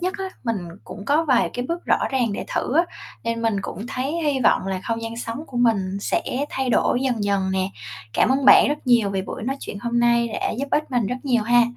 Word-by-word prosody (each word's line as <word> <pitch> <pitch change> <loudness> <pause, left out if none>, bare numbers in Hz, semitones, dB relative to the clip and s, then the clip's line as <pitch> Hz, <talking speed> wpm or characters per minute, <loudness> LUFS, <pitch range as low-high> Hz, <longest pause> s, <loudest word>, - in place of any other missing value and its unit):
nhất 365 +2 -1
á, 385 - -3 0.2
mình 230 -2 0 0.3
cũng 200 - -9
có 305 +6 +2
vài 255 -5 +2
cái 245 - -2
bước 340 +1 -3
rõ - - +3
ràng 245 -6 +1
để - - -4
thử 265 - 0
á, 335 - +5 0.4
nên 230 0 -2
mình 225 -2 +1
cũng 205 +6 -6
thấy 265 +3 -3
hy 290 -3 +1
vọng 220 - +3
là 190 -1 -2
không 230 0 -2
gian 225 0 -5
sống 235 +5 -5
của 250 - -9
mình 200 -6 +1
sẽ 340 +11 0 0.3
thay 265 -1 -1
đổi 245 - +2
dần 245 -6 0
dần 195 -2 +1
nè. 190 0 0 0.4
Cảm - - +3
ơn 270 +1 0
bạn - - +8
rất 295 -1 -3
nhiều 235 -5 +4
vì 195 -1 -1
buổi - - -7
nói 265 +4 -2
chuyện 200 - -6
hôm 240 +1 0
nay 235 0 +3
đã - - 0
giúp 280 +1 -2
ích 300 -1 0
mình 245 -5 +1
rất 250 - -2
nhiều 245 -5 +2
ha. 240 +2 +5
240 Hz, 250 wpm, -23 LUFS, 220-270 Hz, 0.4 s, bạn